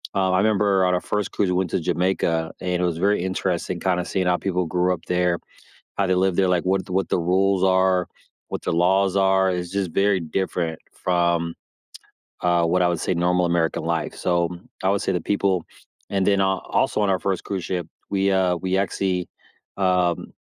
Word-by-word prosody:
Um, 95 -1 +2
I - - +3
remember 100 -2 +3
on 90 - +2
our 90 - -1
first 105 -1 -2
cruise, 100 -3 0
we 90 - +1
went 95 -2 0
to - - +1
Jamaica, 85 -3 0
and 90 -1 -1
it - - +2
was 85 -2 -1
very 100 -1 +2
interesting 90 -1 -2
kinda 90 -2 0
seeing 95 -1 -1
how 90 0 +3
people 90 -2 -1
grew 90 +2 +1
up 85 - -8
there, 90 -1 +1 0.6
how 100 - +2
they 95 - +2
lived 95 -1 +1
there, 95 - +3
like, 90 -2 +1
what 95 0 0
what 95 0 -1
the - - +1
rules 95 +2 +2
are, 95 -1 +3 0.4
what - - -4
the - - -1
laws 95 +3 +2
are. 95 0 +3
It's 90 0 -3
just 95 -3 -2
very 100 +2 +2
different 85 -1 -2 0.2
from, 85 -2 0 0.9
uh, 85 -1 +3
what 90 +2 +2
I 90 - +3
would 85 -2 -1
say 95 - 0
normal 90 +1 +2
American 85 -1 0
life. - - -2
So, 85 -1 +1 0.4
I 95 - +3
would 100 - 0
say - - 0
the 90 - -1
people 95 -3 0 0.5
and 95 -1 0
then 100 -1 +3
a 95 - +3
also - - 0
on 100 - +2
our 95 - +2
first 95 -2 -1
cruise 95 -4 -4
ship, 90 -3 -3 0.2
we, 100 0 +1
uh, 90 -2 +2
we 95 +2 -1
actually, 95 -2 -1 0.5
um 90 -3 +1
90 Hz, 205 wpm, -23 LUFS, 90-95 Hz, 0.9 s, I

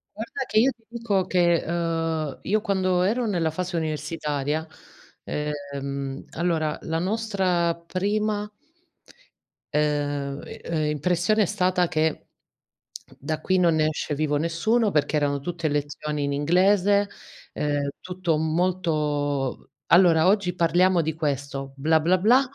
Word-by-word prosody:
Guarda 235 +5 -4
che 215 - +2
io 265 +4 +4
ti 230 - -34
dico 225 -5 0
che, 175 -2 +2
uhm, 165 -3 -2
io 215 +3 +1
quando 185 -3 +1
ero 235 +6 +1
nella 175 -7 0
fase 175 +2 -3
universitaria, 155 -1 -2 0.6
ehm, 140 -2 -4
allora 160 -3 -1
la 160 0 -2
nostra 185 -4 0
prima 205 +5 -2 1.2
uhm 145 -2 -1 0.2
uhm, 155 -2 -1
impressione 180 +8 +1
è - - +2
stata 180 -2 +1
che 155 0 -1 0.9
da 155 +3 -3
qui 185 +4 +1
non 170 -3 +3
ne 155 -1 +2
esce 150 -1 -2
vivo 150 0 0
nessuno 200 +8 +1
perché 150 -1 +1
erano 145 -1 +1
tutte 165 +2 -3
lezioni 145 0 -2
in 140 - -1
inglese, 195 +6 +3 0.4
ehm, 145 -1 -1
tutto 180 -2 -1
molto 155 -5 -1 0.2
"Allora 170 -2 +5
oggi 190 -3 +2
parliamo 175 +1 +3
di 160 +1 -2
questo, 140 -2 -3
bla, 155 +3 +3
bla, 180 +4 +3
bla, 230 +8 +5
165 Hz, 130 wpm, -25 LUFS, 150-185 Hz, 1.2 s, Allora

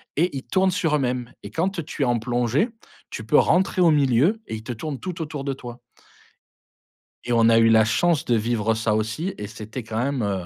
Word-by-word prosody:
et 170 0 +1
ils 135 - -5
tournent 190 +8 +2
sur 165 -5 0
eux-mêmes 125 -3 -2
et - - -8
quand 180 +2 -1
tu 150 - -7
es - - +3
en 120 -1 +1
plongée, 120 - 0 0.4
tu 110 - -6
peux 145 - +3
rentrer 185 +1 +3
au 170 -2 +6
milieu 145 - +2
et - - -4
ils 110 - -8
te 120 - -5
tournent 140 +4 -5
tout 180 -2 -6
autour 150 -3 -5
de 140 -1 -2
toi. 120 -2 -10 1.4
Et 120 - -2
on 115 -1 +4
a 115 - +5
eu 115 0 +5
la 110 -1 +5
chance 160 +7 +1
de 120 - +2
vivre 115 0 0
ça 110 -1 0
aussi 110 - -2
et 105 - -6
c'était 110 +4 -8
quand 110 0 -6
même, 140 -1 -1
heu, 95 -3 -2
125 Hz, 225 wpm, -23 LUFS, 115-160 Hz, 1.4 s, au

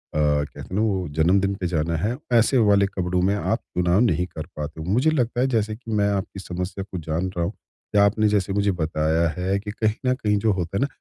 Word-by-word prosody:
कहते 75 -1 0
हैं 95 - -7
ना 105 - +2
वो 95 -5 0
जन्मदिन 95 +5 +3
पे 95 -2 -3
जाना 85 -1 -1
है 110 +10 -1 0.2
ऐसे 120 +3 +4
वाले 100 -1 +5
कपड़ों 90 -2 -1
में 95 +3 +2
आप 110 +3 0 0.2
चुनाव 90 +1 +3
नहीं 105 -7 +2
कर 80 -4 -7
पाते 75 +1 -5
हो। - - -6
मुझे 130 +9 +3
लगता 125 -4 0
है 130 - +3
जैसे 110 -4 0
कि 115 0 -9
मैं 105 -1 +2
आपकी 100 -1 -3
समस्या 90 +1 -4
को 95 - -4
जान 80 +3 -2
रहा 85 -1 0
हूँ 95 - -3 0.4
या 100 0 +6
आपने 105 +1 +2
जैसे 100 -2 0
मुझे 100 0 +2
बताया 80 +1 +1
है 95 +2 0
कि 105 +1 -6
कहीं 110 0 0 0.2
न - - +4
कहीं 105 -4 0
जो 110 - +5
होता 90 0 -3
है - - 0
ना 140 - +2
100 Hz, 240 wpm, -23 LUFS, 85-105 Hz, 0.4 s, या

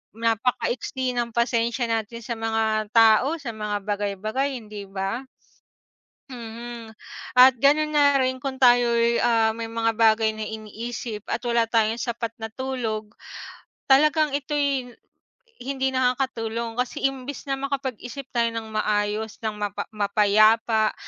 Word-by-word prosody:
Napaka-iksi 245 +3 -1
ng 235 -1 -2
pasensya 235 0 +1
natin 225 +1 -3
sa 240 - -7
mga 220 -1 0
tao 225 +7 +5
sa 275 -7 -6
mga 210 -2 -4
bagay-bagay, 210 +7 -2
hindi 210 -4 -8
ba? 195 +4 -3 1.1
Mm, 235 -1 -8 0.5
at 255 +1 +9
ganun 305 +2 +3
na 285 -1 +4
rin 260 -1 0
kung 270 0 -4
tayo'y, 240 -2 +4
ah, 225 -2 +3
may 225 0 -6
mga 225 0 0
bagay 220 0 +3
na 215 0 -5
iniisip 220 0 -6
at 240 +2 -3
wala 235 -1 +1
tayong 225 0 +1
sapat 230 -1 -3
na 220 - -4
tulog 225 -4 -4 0.7
talagang 300 +1 +4
ito'y 280 -3 -1 0.7
hindi 265 +1 -2
nakakatulong 245 -3 -1
kasi 250 0 -2
imbis 270 +1 -3
na 270 - 0
makapag-isip 270 -1 -5
tayo 235 -2 +1
ng 220 -1 -5
maayos 215 +1 -1
ng 215 -1 -3
mapa 205 0 -4
mapayapa 215 +2 +3
230 Hz, 130 wpm, -24 LUFS, 220-260 Hz, 1.1 s, at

